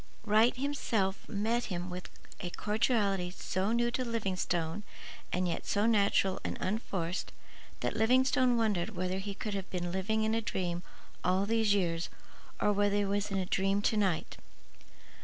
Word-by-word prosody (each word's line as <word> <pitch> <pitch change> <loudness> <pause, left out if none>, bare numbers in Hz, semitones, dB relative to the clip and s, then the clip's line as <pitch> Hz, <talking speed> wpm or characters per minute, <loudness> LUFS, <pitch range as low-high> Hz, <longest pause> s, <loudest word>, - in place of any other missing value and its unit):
Wright 220 +4 +4
himself 230 -8 -1
met 225 +4 0
him 180 -2 -4
with 180 0 -6 0.3
a 175 - -3
cordiality 210 -3 +1
so 185 +2 -2
new 240 +1 +2
to 255 - -1
Livingstone 190 -6 -1 0.5
and 180 0 +1
yet 170 - -3
so 205 +1 +2
natural 200 -3 +3
and - - -3
unforced 185 -4 -2 0.5
that - - -1
Livingstone 255 +2 +4
wondered 210 -3 0
whether 185 +1 -1
he 200 0 -5
could 210 +1 -4
have 195 -1 -4
been 175 -1 -2
living 210 +4 0
in 220 0 +1
a 225 - +1
dream 175 -5 -2 0.4
all 185 +2 +2
these 220 -1 +3
years 170 -3 0 0.5
or 210 - +3
whether 205 0 +2
he 205 0 +2
was 200 +1 0
in 195 - -1
a 190 - 0
dream 195 +2 +1
to 220 - +2
night. 190 -6 0
200 Hz, 160 wpm, -32 LUFS, 185-220 Hz, 0.5 s, Wright